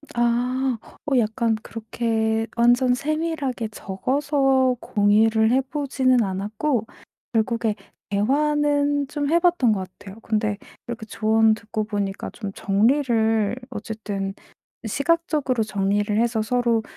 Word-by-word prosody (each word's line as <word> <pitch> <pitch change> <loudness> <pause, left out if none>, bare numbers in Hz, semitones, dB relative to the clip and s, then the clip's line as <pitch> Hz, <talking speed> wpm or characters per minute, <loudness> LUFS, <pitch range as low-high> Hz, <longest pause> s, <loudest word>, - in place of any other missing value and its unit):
아. 245 +2 +1 0.3
어 270 - +3
약간 225 0 +1
그렇게 225 0 -1
완전 245 +2 +4
세밀하게 290 -4 -2
적어서 265 +5 +1
공유를 220 +2 +3
해 260 +2 +4
보지는 260 -3 +1
않았고 210 +6 -1 0.5
결국에 225 -1 0 0.3
대화는 290 +5 +1
좀 290 0 -2
해 335 +2 +4
봤던 345 -9 +3
것 190 -2 -4
같아요. 200 +2 -11
근데 215 -2 -1 0.3
이렇게 235 -2 -5
조언 220 +1 +3
듣고 215 0 -4
보니까 205 -2 -3
좀 205 -4 -6
정리를 225 0 +2
어쨌든 205 -3 -5 0.5
'시각적으로 280 - 0
정리를 205 0 0
해서 235 -2 +1
서로 235 0 +1
230 Hz, 250 characters per minute, -23 LUFS, 215-265 Hz, 0.5 s, 완전